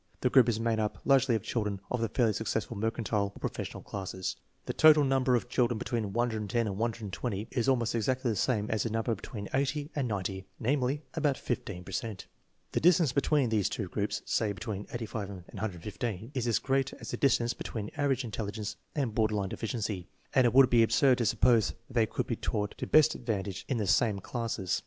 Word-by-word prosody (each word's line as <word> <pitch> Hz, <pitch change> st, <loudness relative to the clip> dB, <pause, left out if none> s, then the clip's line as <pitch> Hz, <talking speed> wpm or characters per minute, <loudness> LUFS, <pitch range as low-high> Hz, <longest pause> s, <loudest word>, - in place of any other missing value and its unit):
The 125 Hz, -, +2 dB
group 125 Hz, -3 st, +6 dB
is 110 Hz, -2 st, 0 dB
made 115 Hz, -1 st, +1 dB
up 105 Hz, -1 st, -1 dB
largely 135 Hz, -3 st, +4 dB
of 110 Hz, -, -2 dB
children 105 Hz, -4 st, -2 dB
of 125 Hz, -, 0 dB
the 115 Hz, -, 0 dB
fairly 115 Hz, -1 st, +2 dB
successful 110 Hz, +1 st, -2 dB
mercantile 105 Hz, -1 st, -1 dB
or -, -, -11 dB
professional -, -, -5 dB
classes. 95 Hz, -2 st, -4 dB, 0.3 s
The -, -, -2 dB
total 155 Hz, -1 st, +7 dB
number 135 Hz, -2 st, +3 dB
of 120 Hz, -, -1 dB
children 120 Hz, -2 st, +1 dB
between 110 Hz, -3 st, -2 dB
110 110 Hz, -2 st, 0 dB
and 100 Hz, -3 st, -2 dB
120 110 Hz, -1 st, -3 dB
is 125 Hz, 0 st, +1 dB
almost 120 Hz, -4 st, +2 dB
exactly 125 Hz, +2 st, 0 dB
the -, -, -1 dB
same 105 Hz, 0 st, +1 dB
as 110 Hz, -2 st, +1 dB
the 115 Hz, -, -1 dB
number 115 Hz, +1 st, 0 dB
between 100 Hz, 0 st, -6 dB
80 140 Hz, +3 st, 0 dB
and 140 Hz, -4 st, 0 dB
90; 95 Hz, -2 st, -3 dB
namely, 135 Hz, +3 st, 0 dB
about 150 Hz, -4 st, +1 dB
15 105 Hz, -7 st, -4 dB
per 95 Hz, -, -10 dB
cent. 105 Hz, +1 st, -4 dB, 0.5 s
The -, -, +1 dB
distance 165 Hz, -4 st, +5 dB
between 140 Hz, -2 st, +2 dB
these 105 Hz, -4 st, +1 dB
two 95 Hz, -5 st, -4 dB
groups 105 Hz, +2 st, -2 dB
(say 105 Hz, -3 st, 0 dB
between 100 Hz, 0 st, -5 dB
85 110 Hz, -4 st, -4 dB
and 95 Hz, -3 st, -8 dB
115) 105 Hz, +3 st, -4 dB
is 125 Hz, -3 st, -1 dB
as 115 Hz, -, +3 dB
great 135 Hz, 0 st, 0 dB
as -, -, -8 dB
the -, -, -3 dB
distance 120 Hz, -3 st, +2 dB
between 105 Hz, -3 st, -5 dB
average 140 Hz, -3 st, +1 dB
intelligence 105 Hz, -1 st, -4 dB, 0.2 s
and 135 Hz, -7 st, -1 dB
border 110 Hz, -1 st, +1 dB
line 100 Hz, -2 st, -1 dB
deficiency, 105 Hz, -5 st, -3 dB, 0.2 s
and 130 Hz, -, +5 dB
it 120 Hz, -, +3 dB
would 135 Hz, -2 st, +7 dB
be 120 Hz, -1 st, +6 dB
absurd 125 Hz, +3 st, +4 dB
to 120 Hz, -, +2 dB
suppose 115 Hz, -4 st, +4 dB
that -, -, -25 dB
they 115 Hz, -3 st, +2 dB
could -, -, -2 dB
be 115 Hz, -, -2 dB
taught 105 Hz, -2 st, -2 dB
to -, -, -3 dB
best 155 Hz, 0 st, +6 dB
advantage 100 Hz, -5 st, -3 dB
in 130 Hz, -, 0 dB
the 105 Hz, -, 0 dB
same 105 Hz, +1 st, +3 dB
classes. 100 Hz, -3 st, -2 dB
115 Hz, 205 wpm, -30 LUFS, 105-125 Hz, 0.5 s, total